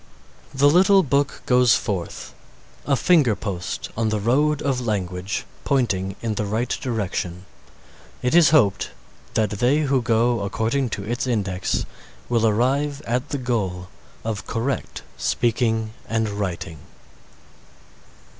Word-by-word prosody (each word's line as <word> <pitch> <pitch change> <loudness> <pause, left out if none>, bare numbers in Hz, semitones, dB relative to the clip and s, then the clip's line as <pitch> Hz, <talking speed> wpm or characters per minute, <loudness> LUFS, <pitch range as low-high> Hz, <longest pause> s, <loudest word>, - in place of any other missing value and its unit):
The 140 +1 +3
little 190 +5 +5
book 140 0 0
goes 125 -2 +5
forth 95 -5 -4 0.5
a 140 - +3
finger 145 - +4
post 90 -6 -4
on 110 0 0
the 110 -1 0
road 145 +7 +2
of 135 -3 0
language 95 -3 -2 0.2
pointing 100 -9 0
in 115 -2 0
the 105 0 -2
right 110 +4 -1
direction. 95 -6 -3 0.8
It 125 - +1
is 170 -2 +7
hoped 105 - +3 0.5
that 110 -1 +2
they 135 +5 +3
who 135 -3 +2
go 115 +1 +2
according 115 +6 -1
to 100 - -6
its 120 +5 -2
index 95 -6 -1 0.4
will 115 -2 +3
arrive 140 +6 +1
at 125 +5 -1
the 145 - -2
goal 100 -8 -2 0.3
of 110 -2 -4
correct 120 +3 -3 0.2
speaking 115 -2 0 0.2
and 110 -1 0
writing. 90 -6 -4
115 Hz, 125 wpm, -23 LUFS, 100-135 Hz, 0.8 s, is